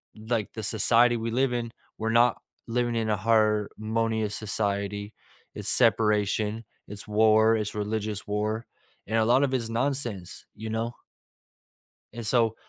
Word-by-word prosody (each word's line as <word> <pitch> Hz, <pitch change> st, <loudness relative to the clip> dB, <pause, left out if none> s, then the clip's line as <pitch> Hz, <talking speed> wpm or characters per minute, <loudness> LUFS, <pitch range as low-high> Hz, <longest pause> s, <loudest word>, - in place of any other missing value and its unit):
like 110 Hz, 0 st, -3 dB
the 110 Hz, -, -5 dB
society 115 Hz, +3 st, +3 dB
we 115 Hz, 0 st, -3 dB
live 130 Hz, +2 st, +1 dB
in, 120 Hz, -1 st, -3 dB, 0.3 s
we're 110 Hz, +1 st, -2 dB
not 120 Hz, +1 st, +4 dB, 0.3 s
living 120 Hz, 0 st, -1 dB
in 110 Hz, -1 st, -1 dB
a 105 Hz, -, +1 dB
harmonious 110 Hz, 0 st, 0 dB
society. 100 Hz, -1 st, -2 dB, 0.4 s
It's -, -, -4 dB
separation. 105 Hz, 0 st, +2 dB, 0.2 s
It's 105 Hz, +1 st, -7 dB
war. 110 Hz, +1 st, +4 dB
It's 105 Hz, -1 st, -3 dB
religious 105 Hz, 0 st, -3 dB
war. 105 Hz, +2 st, -2 dB, 0.4 s
And 110 Hz, +2 st, 0 dB
a 110 Hz, -, +3 dB
lot 125 Hz, +4 st, +4 dB
of 135 Hz, -2 st, 0 dB
it -, -, +3 dB
is 115 Hz, -2 st, -4 dB
nonsense, 120 Hz, -6 st, -2 dB
you 110 Hz, +1 st, -7 dB
know? 115 Hz, +2 st, -2 dB, 1.2 s
And 115 Hz, 0 st, -6 dB
so, 115 Hz, 0 st, +2 dB
110 Hz, 145 wpm, -26 LUFS, 105-115 Hz, 1.2 s, not